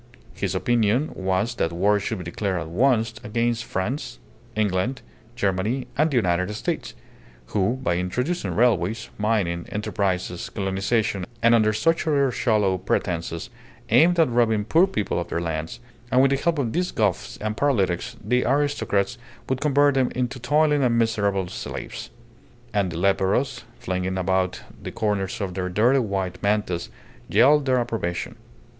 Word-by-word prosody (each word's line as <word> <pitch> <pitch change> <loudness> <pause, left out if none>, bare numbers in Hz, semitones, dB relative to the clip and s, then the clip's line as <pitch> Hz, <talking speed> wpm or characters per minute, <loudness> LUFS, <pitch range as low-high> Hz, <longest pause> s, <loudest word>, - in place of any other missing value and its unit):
His 95 -1 -2
opinion 120 +6 +1
was 95 +5 -1
that 80 - 0
war 100 +4 +2
should 110 +2 -3
be 90 - -6
declared 95 +2 -2
at 80 - -6
once 115 +3 +2
against 115 +2 -1
France, 120 +6 -3 0.4
England, 105 +4 0 0.3
Germany, 105 +3 0
and 155 +3 +3
the 140 - -2
United 90 -2 +1
States, - - -3 0.6
who, 100 +3 +2
by 85 -8 +1
introducing 125 - -2
railways, 110 -2 +1
mining 100 -6 0
enterprises, 95 -4 -2
colonization, 100 +1 -1 0.2
and 115 0 +6
under 110 -2 +4
such 165 +11 +1
other 140 -3 +3
shallow 105 -6 +1
pretences, 85 -2 -2 0.4
aimed 175 +2 +5
at 160 - +5
robbing 110 -3 +2
poor 165 - +4
people 105 - -1
of 85 - -5
their - - -1
lands, 80 -1 -4 0.3
and 130 - +4
with 135 - +4
the 135 - +3
help 170 +3 0
of 125 -6 -1
these 180 +1 0
Goths 105 -5 -1
and 105 0 -3
paralytics, 100 -10 0
the 125 +3 +2
aristocrats 125 -5 0 0.3
would 130 0 -1
convert 145 -1 +4
them 130 -2 +2
into 125 +1 -2
toiling 150 +3 +2
and 120 -3 +2
miserable 100 -5 +1
slaves. - - -6 0.6
And 100 -4 +1
the 85 - -5
leperos, 100 +7 +1
flinging 95 0 -2
about 95 0 0 0.2
the - - -6
corners 100 -3 -1
of 95 -2 -3
their 90 0 -2
dirty 120 +9 +3
white 95 -6 -2
mantas, 100 -4 0 0.4
yelled 140 +7 +5
their 130 -1 +3
approbation. 115 -7 -2
105 Hz, 150 wpm, -24 LUFS, 95-125 Hz, 0.6 s, and